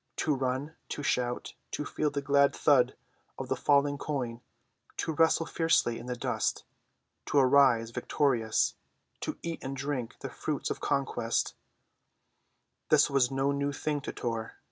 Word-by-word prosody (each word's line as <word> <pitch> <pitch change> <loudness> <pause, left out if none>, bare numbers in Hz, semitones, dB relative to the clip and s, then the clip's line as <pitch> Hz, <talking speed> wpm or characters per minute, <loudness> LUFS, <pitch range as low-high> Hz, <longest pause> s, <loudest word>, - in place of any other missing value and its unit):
To 150 - +1
run, 135 +3 -2
to 145 - -4
shout, 125 -2 -1 0.2
to 150 - -4
feel 150 +1 -1
the 140 -1 -3
glad 140 0 +4
thud 140 -5 +4 0.4
of - - -6
the - - +1
falling 145 0 +2
coin; 125 -6 -3 0.6
to 160 - -1
wrestle 165 +1 +3
fiercely 165 -9 +1
in 120 - -9
the 125 - -2
dust, - - -1 0.6
to - - +1
arise 130 -4 +5
victorious, 115 -4 +1 0.5
to - - -4
eat 170 -1 -4
and 135 +1 -4
drink 135 -4 -3
the - - -4
fruits - - -3
of - - -3
conquest—this 120 -4 0 1.6
was 135 -3 +3
no 135 +1 +1
new 140 0 -1
thing 145 +1 -2
to - - -5
Tor. 115 -2 -4
140 Hz, 145 wpm, -30 LUFS, 125-145 Hz, 1.6 s, arise